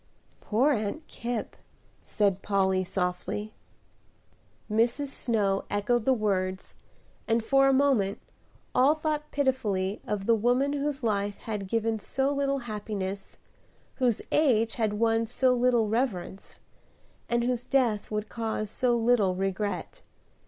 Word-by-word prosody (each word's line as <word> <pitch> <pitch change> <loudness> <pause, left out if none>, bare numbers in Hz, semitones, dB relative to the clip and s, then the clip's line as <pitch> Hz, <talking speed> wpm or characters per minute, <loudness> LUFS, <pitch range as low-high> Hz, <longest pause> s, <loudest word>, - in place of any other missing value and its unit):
"Poor 250 +8 +2
Aunt 230 +6 -2
Kipp!" 235 -4 -4 0.5
said 200 -2 0
Polly, 190 -2 +1
softly. 185 +4 -3 1.1
Mrs. 235 +6 +1
Snow 205 -7 0
echoed 215 +3 0
the 265 - +4
words, 190 -4 -1 0.5
and 225 0 +2
for 270 +3 +4
a - - +5
moment 260 -8 +2 0.5
all 270 +5 +5
thought 305 -1 -2
pitifully 215 -9 0
of 205 -2 -2
the 230 - +4
woman 245 +6 +2
whose 285 -2 -2
life 205 -2 0
had 210 -3 -4
given 225 +1 0
so 270 +6 -1
little 275 -1 0
happiness, 205 -3 -5 0.6
whose 245 -5 +1
age 230 -7 +3
had 220 -3 0
won 225 +1 +1
so 250 +2 +2
little 245 -2 +3
reverence, 210 -5 -2 0.7
and 235 0 +1
whose 250 0 -1
death 240 -7 +1
would 210 0 -3
cause 220 -2 -3
so 250 -2 +1
little 225 -5 +3
regret. 195 - -3
225 Hz, 125 wpm, -28 LUFS, 205-255 Hz, 1.1 s, a